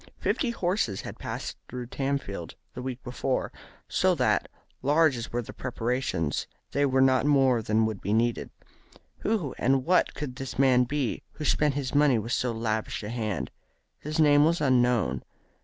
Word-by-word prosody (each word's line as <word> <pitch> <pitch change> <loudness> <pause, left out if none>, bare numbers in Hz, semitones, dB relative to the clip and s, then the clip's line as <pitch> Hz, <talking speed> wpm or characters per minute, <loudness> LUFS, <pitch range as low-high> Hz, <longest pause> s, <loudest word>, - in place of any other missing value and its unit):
Fifty 260 - 0
horses 180 - -1
had - - -8
passed - - -5
through 125 0 -5
Tamfield 130 - -3 0.2
the 125 - -6
week 130 0 -5
before, 130 +1 -2 0.4
so - - +2
that, - - +1 0.3
large 150 +1 +4
as 120 -1 -6
were 120 +1 -1
the - - -10
preparations, 120 - -2 0.2
they 140 0 +2
were 130 0 +2
not 130 +1 +3
more 135 -5 +4
than 110 +1 +2
would 110 -3 -3
be 100 - -2
needed. 115 +2 +1 0.7
Who 200 - -1
and 130 +1 +2
what 180 +1 +3
could 130 -4 -5
this 135 -2 -6
man 130 -2 +4
be 135 -2 -2
who 150 - -6
spent 150 0 +2
his 140 -3 -3
money 145 -4 +4
with 115 +2 -4
so 125 - 0
lavish 110 -1 -2
a 105 - -5
hand? 110 -6 -3 0.5
His 155 +2 -4
name 145 -2 +6
was 165 +2 +3
unknown. 125 -4 +2
130 Hz, 170 wpm, -27 LUFS, 115-145 Hz, 0.7 s, name